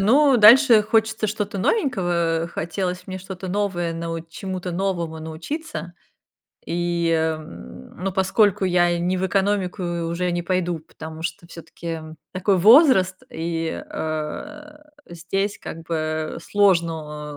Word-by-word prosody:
ну, 265 +6 +5
дальше 230 +1 +8
хочется 220 0 +1
что-то 205 -1 -3
новенького. 175 - 0
Хотелось 180 +2 -3
мне 190 0 -5
что-то 190 0 -7
новое, 180 -4 -1
нау 165 0 -4
чему-то 185 +1 -5
новому 170 -3 -2
научиться. 165 - -6 0.7
И, 170 -1 0
м, 155 - -3
но 195 - 0
поскольку 195 +1 +2
я 175 -1 +2
не 180 +2 0
в 185 - -1
экономику 195 0 0 0.3
уже 180 +1 -1
не 175 - -1
пойду, 175 -2 -1
потому 160 0 -10
что 170 0 -5
все-таки, 170 0 -12
м, 160 -1 -7 0.2
такой 190 +1 +1
возраст, 210 - +6
и, 165 0 -3
э, 295 - -5 0.3
здесь, 195 +4 -3
как 165 - -7
бы, 155 -1 -2
сложно, 160 -7 0
180 Hz, 125 wpm, -22 LUFS, 165-200 Hz, 0.7 s, дальше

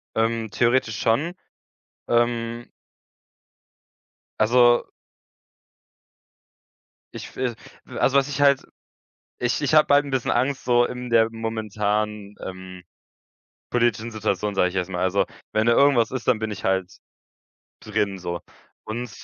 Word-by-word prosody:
Ähm, 115 0 0
theoretisch 120 -3 +1
schon, 145 +10 +1 0.7
ähm 120 0 0 1.7
also 120 +2 +4 2.3
ich - - -9
will 125 -2 -2 0.3
w - - -9
also, 135 - +3
was 135 -1 +3
ich 145 0 -3
halt 140 -1 +4 0.8
ich 125 +4 0
ich 145 +1 0
habe 150 -2 +5
halt 145 +1 +5
‘n 140 - -7
bisschen 130 -2 0
Angst, 130 +3 0
so 120 -1 +4
in 125 0 -6
der 115 -1 +4
momentanen, 105 -2 -2
ähm, 95 -1 -8 0.9
politischen 115 -2 +1
Situation, 105 -2 -2
sage 90 -2 +3
ich 90 - -9
jetzt 90 0 -2
mal, 90 -1 -2
also, 95 +2 +2 0.3
wenn 110 +1 +1
da 120 - +5
irgendwas 130 -4 +4
ist, 130 -2 -5
dann 125 -3 +4
bin 110 0 -3
ich 100 -2 -7
halt 95 -1 0 0.9
drin 100 -2 -1
so 85 -1 -4 0.4
und 120 +1 -5
115 Hz, 130 wpm, -23 LUFS, 105-125 Hz, 2.3 s, habe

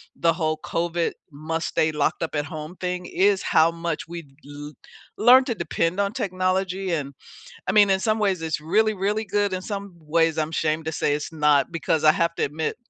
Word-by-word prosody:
the 165 - +2
whole 155 -2 -1
COVID 170 0 -1 0.2
must-stay-locked-up-at-home 155 0 -2
thing, 180 0 -3
is 195 0 +2
how 160 +1 +4
much 165 -1 -4
we'd 165 -5 -9
l 145 +1 -9 0.5
learn 250 +4 +7
to 235 - -2
depend 170 0 -1
on 200 +1 0
technology. 190 -3 -1
And, 140 -3 -3 0.6
I - - +2
mean, 205 -1 +6
in 190 0 +2
some 215 +2 +1
ways 195 -5 0
it's 160 -1 -2
really, 215 +7 +2
really 205 +3 -1
good. 205 0 0
In 185 0 -3
some 200 -1 -6
ways, 165 +1 +1
I'm 155 0 -1
shamed 160 0 -1
to 160 - -2
say 145 - 0
it's 150 +2 -5
not, 150 -1 +3
because 165 -1 -1
I 155 - +8
have 170 +1 0
to - - -2
admit, 155 +2 -3
170 Hz, 180 wpm, -24 LUFS, 155-195 Hz, 0.6 s, I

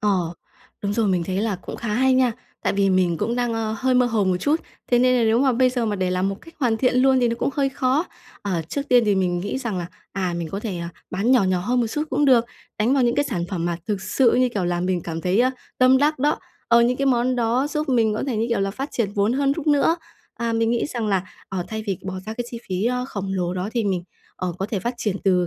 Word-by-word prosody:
Ờ. 185 -5 +1 0.5
Đúng 200 0 -1
rồi, 225 -1 +1
mình 180 -3 +1
thấy 185 +1 -3
là 205 -1 0
cũng 180 - -8
khá 235 - -5
hay 260 +5 +3
nha. 255 -2 +3 0.3
Tại - - +1
vì 195 -1 +2
mình 180 -3 +2
cũng 230 +3 -1
đang, 245 -1 0
ơ, 220 -1 -1
hơi 260 -1 +1
mơ 250 0 +4
hồ 220 -4 +1
một 185 -1 +2
chút. 295 - +1 0.3
Thế 245 - +5
nên 255 0 +4
là - - +2
nếu 225 +1 +3
mà 265 0 +3
bây 255 +1 +3
giờ 245 -2 -1
mà 210 - -1
để 185 -1 0
làm 185 +1 +1
một 195 - -2
cách 330 - -15
hoàn 235 -4 +2
thiện 250 +2 +2
luôn 265 -1 +4
thì 240 - +3
nó 230 - 0
cũng - - 0
hơi 275 0 +1
khó. 265 +5 +1 0.4
À, 180 -5 -1
trước 280 - -2
tiên 245 -1 +6
thì 205 - +3
mình 180 -2 +1
nghĩ 205 +7 -3
rằng 225 -8 -3
là, 170 - -3 0.3
à, 185 -3 -1
mình 165 -2 -3
có 195 - -4
thể, 195 -6 -4
ờ, 170 - -4 0.2
bán 200 +7 0
nhỏ 250 -6 +5
nhỏ 185 -1 +1
hơn 245 +6 +1
một 230 - +1
xút 300 +7 -3
cũng 290 +3 +2
được, 250 -4 +5 0.3
đánh 230 +5 +3
vào 270 - +3
những 240 -1 +2
cái 290 - +2
sản 180 -11 -2
phẩm 175 -4 -2
mà 170 - -1
thực 205 -2 -1
sự, 245 +4 +2
như 255 0 +3
kiểu 205 -6 -2
là, 175 0 0
mình 180 0 0
cảm 165 -1 -4
thấy, 185 +6 +2
a, 255 +1 +4 0.3
tâm 255 +1 +6
đắc 295 0 +2
đó. 295 +3 +1 0.3
Ờ, 235 0 +6
những 245 +2 +2
cái 275 +1 0
món 250 0 +2
đó 240 +4 +1
giúp 305 0 -2
mình 230 -5 +2
có 215 - -2
thể, 250 -5 -1
như 225 - 0
kiểu 235 -4 0
là, 195 - 0
phát 265 +8 -5
triển 205 -4 -1
vốn 205 +2 +1
hơn 275 +1 +2
rút 310 +1 -5
nữa. 295 +3 +3 0.4
À, 230 0 -2
mình 225 0 +1
nghĩ 240 +3 +1
rằng 235 -6 -3
là, 195 -3 +1 0.3
ờ, 185 -2 -3
thay 220 0 -4
vì 195 -3 -1
bỏ 190 - -4
ra 220 - -3
cái 245 - -3
chi 235 - -6
phí, 185 +2 -1
ơ, 250 +1 0
khổng 195 -4 -4
lồ 180 -1 -1
đó 185 +3 -2
thì 235 -3 0
mình, 185 -3 -1 0.3
ờ, 180 -1 -2
có 195 - -1
thể 210 -3 -2
phát 240 +5 -3
triển 210 -4 -1
từ 180 -2 +3
225 Hz, 290 wpm, -23 LUFS, 190-255 Hz, 0.5 s, tiên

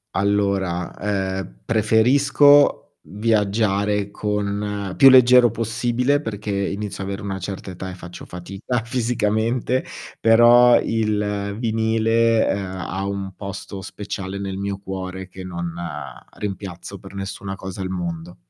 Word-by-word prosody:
Allora, 100 -3 0 0.5
ehm, - - -9
preferisco 135 +6 +4
viaggiare 105 +1 0
con 105 -1 -2
più 135 - +8
leggero 125 -1 +7
possibile, 120 +4 0
perché 105 -6 -5
inizio 100 0 -3
a - - -5
avere 100 +1 -4
una 95 -1 -4
certa 95 +1 -6
età 95 +1 -7
e - - -7
faccio 90 -1 -10
fatica 95 +7 -4
fisicamente, 120 +1 0 0.3
però 120 +2 +7
il 105 -2 -1
vinile, 115 0 +2
uhm, 100 - -2 0.3
ha 95 +1 -3
un 100 -1 -4
posto 100 0 -7
speciale 100 -1 -6
nel 95 -1 -4
mio 100 0 -3
cuore, 95 -1 -6
che 95 0 -9
non, 85 -1 -4
uhm, 75 -6 -8
rimpiazzo 95 -1 -6
per 95 +1 -13
nessuna 95 0 -5
cosa 95 0 -8
al 95 - -2
mondo. 85 -2 -5
100 Hz, 125 wpm, -22 LUFS, 95-115 Hz, 0.5 s, più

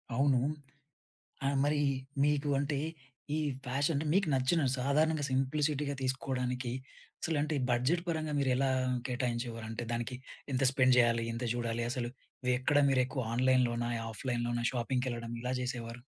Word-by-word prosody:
అవును. 135 -1 +4 1.1
ఆ - - +4
మరి 145 0 +2 0.4
మీకు 145 0 +2
అంటే 140 0 -1 0.6
ఈ - - +1 0.3
ఫ్యాషన్ 140 +5 +1
అంటే 150 +3 -1
మీకు 195 -3 +3
నచ్చిన 135 +6 +2 0.2
సాధారణంగా 150 +3 +2
సింప్లిసిటీగా 140 +2 0
తీసుకోవడానికి 130 -1 -1 0.5
అసలంటే 150 -1 0 0.2
బడ్జెట్ 130 +9 +2
పరంగా 155 -2 -1
మీరెలా 135 0 +2 0.4
కేటాయించేవారు? 120 -2 -2
అంటే 115 +2 -4
దానికి 120 +2 -2 0.4
ఎంత 130 +1 +1
స్పెండ్ 130 -2 +4
జేయాలి? 115 -1 +4
ఎంత 115 +2 -4
జూడాలి 120 -1 -1
అసలు? 120 -2 -2 0.4
వే 125 - +3
ఎక్కడ 145 +3 +2
మిరెక్కువగా 130 -2 +1
ఆన్లైన్‌లోనా, 125 -2 +2 0.2
ఆఫ్లైన్‌లోనా 120 +1 -2
షాపింగ్‌కెళ్ళడం 120 -1 -2
ఇలా 125 +1 -1
జేసేవారు? 120 -1 -4
130 Hz, 125 wpm, -32 LUFS, 120-145 Hz, 1.1 s, అవును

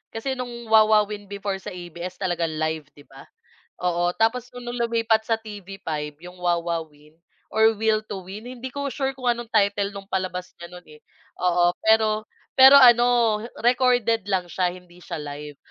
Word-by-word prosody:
Kasi 265 +4 -3
no'ng 240 -3 -6
Wowowin 210 -2 +4
before 200 -1 -4
sa 190 - -8
ABS. 175 +1 -7
live, 160 -3 -2
'di 145 - -16
ba, 135 0 -15 0.5
oo, 175 0 0
tapos 240 +2 +1
kung 245 -1 -10
nung 240 - -4
lumipat 230 -1 +1
sa 225 -1 +1
TV5 195 -8 -6
yung 180 +1 -12
Wowowin, 165 -3 -3 0.4
or 220 0 +5
Will 220 -1 +1
to 200 -3 -7
Win? 210 +5 -9
Hindi 255 +1 -7
ko 280 -1 -3
sure 270 -1 -2
kung 255 -2 0
anong 235 -1 -4
title, 200 -1 +2
no'ng 195 0 -10
palabas 185 -1 -3
niya 170 - -8
no'n 180 0 -12
eh, 150 - -14 0.9
pero 215 -1 +3 0.3
pero 265 +2 +10
ano, 240 -3 +6 0.2
recorded 240 -3 +2
lang 190 -3 0
siya, 180 +1 0
hindi 180 -1 -16
siya 175 -1 -7
live. 145 0 -8
205 Hz, 160 wpm, -24 LUFS, 175-230 Hz, 0.9 s, pero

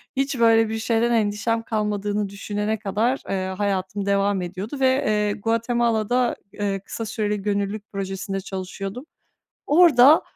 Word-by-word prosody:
hiç 270 -1 -1
böyle 225 -1 +5
bir 220 0 -3
şeyden 230 +1 +1
endişem 225 +1 0
kalmadığını 210 -2 -1
düşünene 205 +2 -3
kadar, 215 +6 0
eee, 190 -1 -1
hayatım 195 0 -1
devam 200 -1 +1
ediyordu 190 +9 -5
ve, 265 +1 +3
eee, 210 -1 +1
Guatemala'da, 230 +2 +1 0.2
eee, 200 -1 -2
kısa 225 +3 -6
süreli 210 -1 -2
gönüllülük 205 +1 -2
projesinde 195 0 -4
çalışıyordum. 195 +5 -6 0.6
Orada 300 -3 +6
210 Hz, 125 wpm, -23 LUFS, 200-230 Hz, 0.6 s, Orada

